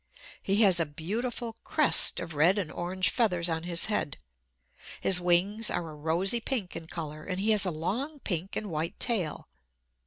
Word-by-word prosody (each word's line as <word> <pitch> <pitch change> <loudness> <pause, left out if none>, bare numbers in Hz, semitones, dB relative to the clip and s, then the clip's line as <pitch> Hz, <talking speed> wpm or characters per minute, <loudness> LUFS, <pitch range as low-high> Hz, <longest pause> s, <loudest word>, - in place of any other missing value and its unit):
He 200 +3 +2
has 185 -4 +5
a 165 - 0
beautiful 225 - -5
crest 305 -2 +5
of 170 -2 -7
red 165 +7 +3
and 185 -6 -3
orange 185 +2 -1
feathers 180 -8 +1
on 160 0 -3
his 170 -1 +1
head. 205 -9 -2 0.8
His 185 -2 +4
wings 185 +5 +1
are 165 -2 -3
a - - -11
rosy 170 +9 +1
pink 230 -6 -4
in 165 -1 -7
color; 155 -2 -7
and 185 +1 -4
he 215 +3 +1
has 205 -3 +3
a - - +1
long 210 - -4
pink 180 0 -3
and 210 -4 -4
white 160 +1 -3
tail. 200 -11 0
180 Hz, 180 wpm, -28 LUFS, 165-215 Hz, 0.8 s, has